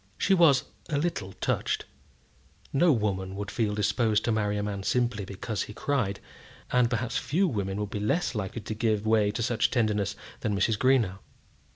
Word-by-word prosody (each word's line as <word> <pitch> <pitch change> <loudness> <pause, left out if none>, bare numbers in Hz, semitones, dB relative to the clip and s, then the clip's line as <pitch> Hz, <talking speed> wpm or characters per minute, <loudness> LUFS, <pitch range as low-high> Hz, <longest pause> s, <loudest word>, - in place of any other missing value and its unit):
She 195 - +2
was 165 -8 +5 0.3
a 150 - 0
little 140 - -2
touched. - - -1 0.9
No 165 +5 +5
woman 95 -6 -1
would 100 0 -5
feel 105 -3 0
disposed 105 +1 +1
to 115 - +1
marry 105 -1 0
a 100 - -1
man 100 -1 -3
simply 120 -1 0
because 100 +3 -4
he 105 - -6
cried, 110 -10 -1 0.5
and 125 -2 +4
perhaps 115 0 -1
few 185 +7 +1
women 100 - -2
would 105 -1 -3
be 105 - -3
less 110 +13 0
likely 105 +1 -4
to 110 - -5
give 110 -1 0
way 110 -2 +3
to 110 +3 -2
such 120 0 +1
tenderness 105 -4 0 0.2
than 105 -3 -1
Mrs. 105 +2 +1
Greenow. 120 -8 +3
110 Hz, 180 wpm, -28 LUFS, 105-125 Hz, 0.9 s, was